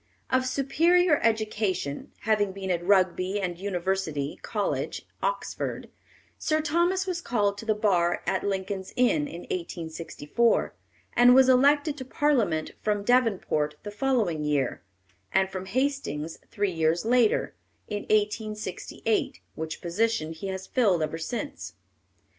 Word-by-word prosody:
Of 260 0 +2
superior 315 +5 +3
education, 210 -9 -1
having 205 -3 +1
been 190 -1 -3
at 175 -1 -1
Rugby 185 +1 +2
and 175 -3 -3
University 180 -6 -2
College, - - -2 0.2
Oxford, - - -3 0.5
Sir 310 -1 +1
Thomas 345 +5 +1
was 360 -2 -3
called 205 -8 +1
to 225 - -9
the 215 - +3
bar 180 -5 +1
at 190 - 0
Lincoln's 195 -1 -3
Inn 290 +4 +2
in 175 -10 -8
1864, 170 +5 -1 0.4
and 245 +1 +7
was 265 0 +7
elected 285 +3 +4
to 260 - -6
Parliament 235 - +1
from 205 -1 0
Devonport 200 -11 +2
the 205 - -6
following 205 - 0
year, 145 -4 0 0.5
and 190 0 +2
from 190 0 -5
Hastings 250 - -2
three 205 -3 -1
years 165 +2 +1
later, 235 -2 +3 0.3
in 210 -1 -3
1868, 215 0 -1
which 160 0 -5
position 180 -2 0
he 165 +5 -6
has 190 0 -4
filled 195 -11 +2
ever 155 +1 -3
since. 245 - -5
205 Hz, 130 wpm, -27 LUFS, 175-250 Hz, 0.5 s, and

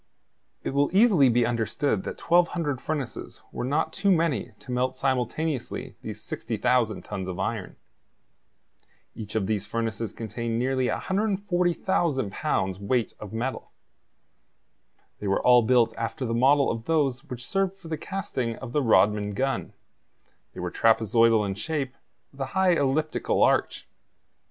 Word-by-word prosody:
It - - -2
will 140 0 +2
easily 195 - +6
be 120 0 +3
understood 115 0 0
that - - -5
1,200 170 -5 +1
furnaces 140 -8 -4
were - - -4
not 145 +5 0
too 200 - 0
many 165 -8 +1
to 130 - -10
melt 125 +1 0
simultaneously 135 +1 -2
these - - -6
60,000 120 -4 0
tons 95 -1 -5
of 90 -1 -4
iron. 100 0 -3 1.4
Each 110 0 -8
of 110 -3 +1
these 105 -1 -2
furnaces 115 -1 -2
contained 115 0 -3
nearly 130 +1 +1
140,000 180 - 0
pounds 95 -1 -1
weight 115 +3 0
of 105 -2 -8
metal. 120 +4 -4 1.5
They 105 - -4
were 95 - +1
all 125 -1 +7
built 115 -1 +3
after 115 +4 -3
the 115 - -2
model 135 +4 +4
of 115 0 -5
those 140 -5 +1
which 125 -1 -7
served 195 -1 0
for 185 - -13
the 160 - -2
casting 155 - -3
of 130 0 -8
the 150 - +1
Rodman 105 -3 +3
gun; 135 +4 -1 0.8
they - - -8
were - - -3
trapezoidal 115 0 +3
in 100 - -2
shape, 135 +5 -3 0.4
with 140 - -11
a - - +1
high 190 -1 +4
elliptical 155 +1 +1
arch. - - +1
125 Hz, 145 wpm, -26 LUFS, 115-155 Hz, 1.5 s, all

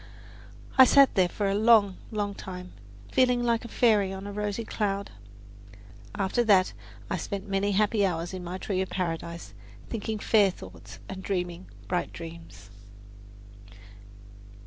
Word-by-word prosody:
I 260 - +11
sat 275 +1 +6
there 185 -3 +3
for 205 +3 -2
a 195 - +1
long, 210 -2 +4
long 205 -2 -2
time, 180 -2 -8 0.4
feeling 250 -1 +3
like 235 -1 +1
a - - -7
fairy 215 -5 +3
on 195 +1 -7
a 205 - -5
rosy 210 +2 -3
cloud. 200 -2 -2 1.0
After 200 +3 +1
that 195 -5 +4 0.4
I - - 0
spent 200 0 -5
many 200 +1 0
happy 210 +1 +2
hours 175 -2 -1
in 185 -1 -6
my 180 +1 -5
tree 190 0 -2
of 190 - -3
paradise, 170 -1 -4 0.4
thinking 220 -1 -3
fair 210 -1 +4
thoughts 95 - -11
and 190 0 -7
dreaming 180 -2 -3 0.2
bright 180 -1 -1
dreams. 165 -10 -11
195 Hz, 145 wpm, -27 LUFS, 180-215 Hz, 1.0 s, I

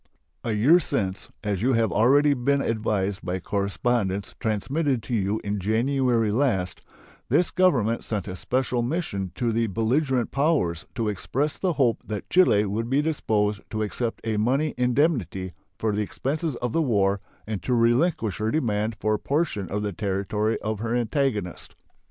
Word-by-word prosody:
A 115 - -1
year 135 +12 +5
since, 95 - -2
as 100 -3 -1
you 130 +3 +2
have 115 -2 +2
already 140 +6 +4
been 140 +2 +1
advised 105 -5 -1
by 90 +1 -2
correspondence 100 +1 -1
transmitted 130 +5 0
to 125 - -5
you 105 0 0
in 105 0 -2
January 115 +2 +1
last, 105 -7 0 0.5
this 175 - +2
Government 125 - +2
sent 105 -3 -3
a 95 - -5
special 125 +4 -1
mission 120 - -2
to 115 +4 0
the 115 +1 +1
belligerent 125 - 0
powers 140 - +1
to 115 -2 -1
express 135 +8 -2
the 185 -2 +1
hope 125 -6 +2
that 105 -2 -4
Chile 140 - +5
would 110 +4 -2
be 140 +3 +2
disposed 105 -9 0
to 110 0 -2
accept 115 +3 -3
a 110 -2 0
money 135 +8 +1
indemnity 125 - +1 0.3
for 110 - 0
the 105 +1 0
expenses 145 - -2
of 120 -1 -3
the 165 - +2
war 100 -8 +2 0.3
and 105 -3 -4
to 125 - 0
relinquish 115 - +2
her 110 +1 0
demand 110 -6 0
for 110 - +1
a 105 - 0
portion 140 - -1
of 105 +3 -2
the 105 -1 -2
territory 105 +2 -1
of 110 -1 -2
her 115 +2 -1
antagonist. 120 - -1
115 Hz, 165 wpm, -25 LUFS, 105-135 Hz, 0.5 s, year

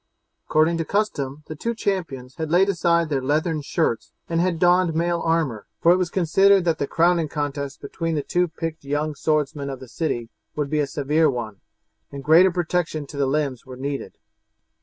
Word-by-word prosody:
According 160 +2 +2
to - - +1
custom 150 -9 -2
the 155 - -7
two 235 +9 -3
champions 150 - -3
had 160 -1 -3
laid 185 +4 +4
aside 170 -3 +2
their 140 -3 0
leathern 155 +4 0
shirts 145 -5 -1 0.2
and 165 0 0
had 180 -2 +1
donned 175 -1 +3
mail 170 +1 +1
armour, 155 -10 0
for 170 - +5
it 180 - +5
was 180 -2 -1
considered 190 +2 +4
that 165 -2 +1
the 140 - -1
crowning 170 -1 +2
contest 145 -2 -4
between 165 +3 -3
the 145 - -1
two 180 0 +1
picked 165 -1 -6
young 145 +2 -1
swordsmen 145 -1 -1
of 135 -2 -6
the 130 - -10
city 120 -5 -3 0.3
would 145 -2 -2
be 155 - +1
a 145 - +1
severe 150 +3 +2
one, 115 -6 -5 0.5
and 140 -1 -7
greater 165 +6 +6
protection 175 -3 -1
to 140 - -11
the 140 -1 +1
limbs 140 -3 -1
was 130 -1 -9
needed. 140 0 -4
155 Hz, 190 wpm, -23 LUFS, 140-170 Hz, 0.5 s, greater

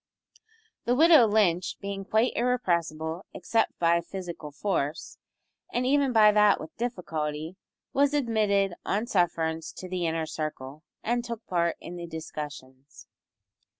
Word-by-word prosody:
The 245 - +2
widow 310 -4 +7
Lynch, 190 -5 +2
being 200 -1 -5
quite 220 +5 +2
irrepressible 170 -9 0
except 225 -1 0
by 170 0 +3
physical 170 -3 -7
force, 145 -2 -3 0.5
and 245 +1 0
even 280 0 +3
by 215 -3 +6
that 210 -1 +4
with 155 - -9
difficulty, 160 -8 -3 0.4
was 285 +1 +3
admitted 210 -7 +2
on 210 +4 -1
sufferance 165 -6 0
to 185 - -8
the 180 -2 -2
inner 160 0 -1
circle, 155 -2 -5 0.2
and 240 +1 0
took 235 -1 -6
part 170 -3 0
in 175 - -8
the 170 0 -6
discussions. 145 -4 -8
180 Hz, 130 wpm, -27 LUFS, 160-225 Hz, 0.5 s, widow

